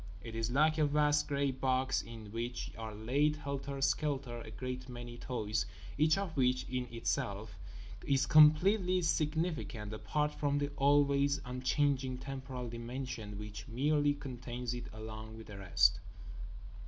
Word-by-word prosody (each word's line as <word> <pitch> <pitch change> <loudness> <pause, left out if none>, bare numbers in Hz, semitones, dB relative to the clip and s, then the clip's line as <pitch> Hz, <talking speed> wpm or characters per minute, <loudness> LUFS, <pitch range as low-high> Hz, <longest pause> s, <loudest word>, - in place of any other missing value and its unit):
It 115 - -7
is 115 0 -1
like 155 +5 +3
a 150 - +4
vast 150 0 +3
grey 140 -1 +1
box 130 0 +1
in 110 -3 -10
which 120 +2 -4
are 110 -1 -6
laid 140 +8 +2
helter 140 -1 -4
skelter 135 -3 0
a 110 - -9
great 130 +3 -5
many 120 -1 -7
toys, 110 -5 -2 0.3
each 155 +3 +4
of 195 -4 -3
which 130 -2 +2
is 125 0 -2
itself 105 -2 -2 0.7
completely 180 +5 +6
significant 155 - -1
apart 150 +7 -1
from 145 -1 0
the 145 0 0
always 140 0 +3
unchanging 130 +1 0
temporal 130 -2 -6
dimension 115 -2 -5
which 105 0 -7
merely 145 +4 +2
contains 125 -2 -5
it 120 0 -6
along 110 0 -8
with 110 - -9
the 105 - -9
rest. 95 -1 +4
130 Hz, 140 wpm, -34 LUFS, 115-145 Hz, 0.7 s, completely